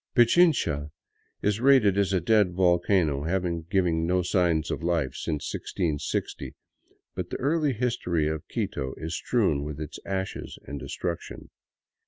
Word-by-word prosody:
Pichincha 120 - +4 0.5
is 105 +1 +1
rated 125 -6 +5
a 100 -2 +2
dead 100 0 +3
volcano, 90 -4 +2
having 85 -2 -1
given 85 -4 +1
no 90 +1 +2
siigns 85 -3 +1
of - - -3
life 80 -6 0
since 75 -3 -3
1660; 80 -6 -3 0.6
but - - -4
the - - -3
early 150 0 +1
history 95 -10 0
of 80 -1 -4
Quito 65 0 -3
is 80 +1 -4
strewn 95 - +1
with 75 0 -6
its 75 -2 -6
ashes 95 0 -4
and 70 0 -6
destruction. 85 +5 -5
90 Hz, 135 wpm, -27 LUFS, 80-100 Hz, 0.6 s, rated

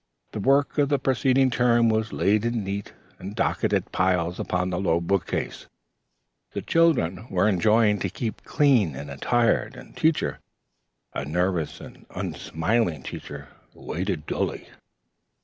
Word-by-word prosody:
The - - -5
work 140 +6 +2
of 140 -1 +3
the 145 - +3
preceding 130 0 +2
term 120 -1 +3
was 110 0 +1
laid 105 +2 +2
in 115 -2 -1
neat 100 +1 -4 0.3
and 100 +3 -7
docketed 115 - 0
piles 90 -1 +1
upon 90 0 -1
the 90 - -1
low 85 -3 +2
book 85 +1 0
case. - - -4 0.9
The - - -4
children 120 - +2
were 90 +2 +2
enjoined 105 +1 +3
to - - -1
keep 115 -4 -5
clean 125 - +3
and 70 +2 -7
entire. 115 - +1
And - - -13
Teacher, 160 0 +1 0.7
a - - -3
nervous 90 +2 -1
and - - -13
unsmiling 80 - -1
Teacher, 70 +2 -8 0.3
waited 90 -3 -4
dully. - - -3
100 Hz, 140 wpm, -25 LUFS, 85-120 Hz, 0.9 s, of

